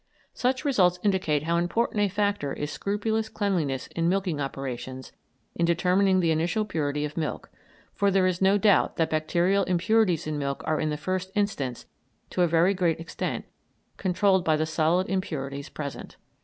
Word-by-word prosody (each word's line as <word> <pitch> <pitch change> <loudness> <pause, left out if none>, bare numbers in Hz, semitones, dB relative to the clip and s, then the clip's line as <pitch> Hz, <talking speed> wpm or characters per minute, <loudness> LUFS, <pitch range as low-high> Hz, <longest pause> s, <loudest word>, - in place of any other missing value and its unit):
Such 260 +3 -1
results 185 -10 +3
indicate 185 -8 +1
how 170 +2 +1
important 190 +6 0
a 205 - +3
factor 200 -7 -1
is 150 0 -4
scrupulous 215 +7 -1
cleanliness 165 -11 -1
in 170 0 -1
milking 185 -5 0
operations 130 -2 -5 0.4
in 170 - -2
determining 185 +3 +3
the 165 -2 +2
initial 170 +7 0
purity 150 -6 -1
of 150 +2 -7
milk, 155 -2 -3 0.4
for 200 -1 +2
there 190 -1 +3
is 185 -1 0
no 195 +1 +5
doubt 205 0 +3
that 165 -2 +1
bacterial 170 +5 +2
impurities 185 -1 +2
in 155 -1 -3
milk 140 -1 -3
are 155 -1 0
in 155 - 0
the 150 - -2
first 185 +3 -3
instance, 145 - -1 0.5
to 180 - 0
a 175 - +5
very 170 +4 +3
great 175 -4 0
extent, 165 - -4 0.5
controlled 190 0 +2
by 160 -2 +3
the 155 +1 0
solid 160 +4 +1
impurities 140 -7 -3
present. 145 -2 -7
175 Hz, 170 wpm, -26 LUFS, 155-195 Hz, 0.5 s, no